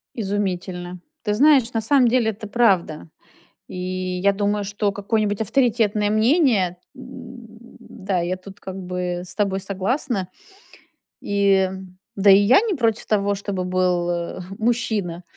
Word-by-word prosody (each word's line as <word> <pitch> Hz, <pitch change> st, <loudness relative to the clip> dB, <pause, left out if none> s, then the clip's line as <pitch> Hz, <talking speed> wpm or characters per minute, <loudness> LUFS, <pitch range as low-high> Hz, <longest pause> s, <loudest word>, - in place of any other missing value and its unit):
Изумительно. 185 Hz, -4 st, -3 dB, 0.2 s
Ты 210 Hz, -, 0 dB
знаешь, 265 Hz, 0 st, +4 dB
на 225 Hz, -, 0 dB
самом 255 Hz, +3 st, +3 dB
деле 235 Hz, -2 st, +2 dB
это 215 Hz, 0 st, -9 dB
правда. 195 Hz, -9 st, +1 dB, 0.6 s
И -, -, -8 dB, 0.4 s
я 200 Hz, +1 st, +3 dB
думаю, 205 Hz, +1 st, -1 dB
что 205 Hz, +1 st, -1 dB
какое-нибудь 205 Hz, +1 st, -1 dB
авторитетное 220 Hz, -3 st, +1 dB
мнение, 215 Hz, -, +2 dB, 0.2 s
м 250 Hz, -2 st, -11 dB, 0.3 s
да, 190 Hz, -1 st, -4 dB
я 175 Hz, +2 st, -1 dB
тут 190 Hz, +1 st, -13 dB
как 190 Hz, -, -8 dB
бы 180 Hz, -1 st, -4 dB
с -, -, -8 dB
тобой 195 Hz, -2 st, 0 dB
согласна. 200 Hz, +1 st, -2 dB, 0.9 s
И 195 Hz, -2 st, +2 dB, 0.5 s
Да 200 Hz, 0 st, +5 dB
и 195 Hz, -, +8 dB
я 205 Hz, -, +5 dB
не 435 Hz, -5 st, -1 dB
против 230 Hz, -5 st, 0 dB
того, 205 Hz, -1 st, +1 dB
чтобы 195 Hz, -2 st, -4 dB
был, 180 Hz, -1 st, 0 dB
э, 170 Hz, +1 st, -4 dB, 0.2 s
мужчина. 220 Hz, -7 st, -1 dB
205 Hz, 135 wpm, -22 LUFS, 185-230 Hz, 0.9 s, и